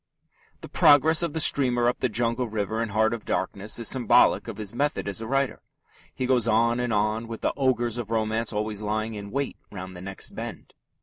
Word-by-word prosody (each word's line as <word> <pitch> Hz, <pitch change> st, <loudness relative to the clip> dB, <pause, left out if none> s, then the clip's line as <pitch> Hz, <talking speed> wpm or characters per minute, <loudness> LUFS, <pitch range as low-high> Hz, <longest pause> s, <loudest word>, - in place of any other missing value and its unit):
The -, -, -8 dB
progress 155 Hz, +3 st, +5 dB
of 170 Hz, -4 st, -1 dB
the 160 Hz, -, -2 dB
steamer 125 Hz, -5 st, +4 dB
up 120 Hz, -, 0 dB
the 130 Hz, -, 0 dB
jungle 115 Hz, +2 st, -1 dB
river 110 Hz, 0 st, -2 dB
in 115 Hz, -, -2 dB
Heart 110 Hz, +2 st, +2 dB
of 115 Hz, -, -5 dB
Darkness 100 Hz, +2 st, -2 dB
is 115 Hz, -2 st, -1 dB
symbolic 125 Hz, -5 st, +3 dB
of -, -, -6 dB
his 105 Hz, -1 st, -5 dB
method 145 Hz, -2 st, -1 dB
as 100 Hz, +2 st, -3 dB
a 110 Hz, -, -5 dB
writer. 135 Hz, +1 st, -1 dB, 0.5 s
He 130 Hz, -, -2 dB
goes 125 Hz, -3 st, +2 dB
on 115 Hz, +2 st, +2 dB
and 125 Hz, -1 st, -1 dB
on, 110 Hz, +2 st, 0 dB
with 115 Hz, -1 st, -7 dB
the -, -, 0 dB
ogres 120 Hz, -3 st, 0 dB
of 115 Hz, -3 st, -5 dB
romance 110 Hz, 0 st, -1 dB
always 105 Hz, -1 st, -3 dB
lying 110 Hz, +1 st, -2 dB
in 100 Hz, -1 st, -7 dB
wait 140 Hz, +5 st, -3 dB
round 95 Hz, -2 st, -8 dB
the 90 Hz, -, -9 dB
next 95 Hz, +1 st, -4 dB
bend. -, -, -8 dB
115 Hz, 210 wpm, -25 LUFS, 105-125 Hz, 0.5 s, progress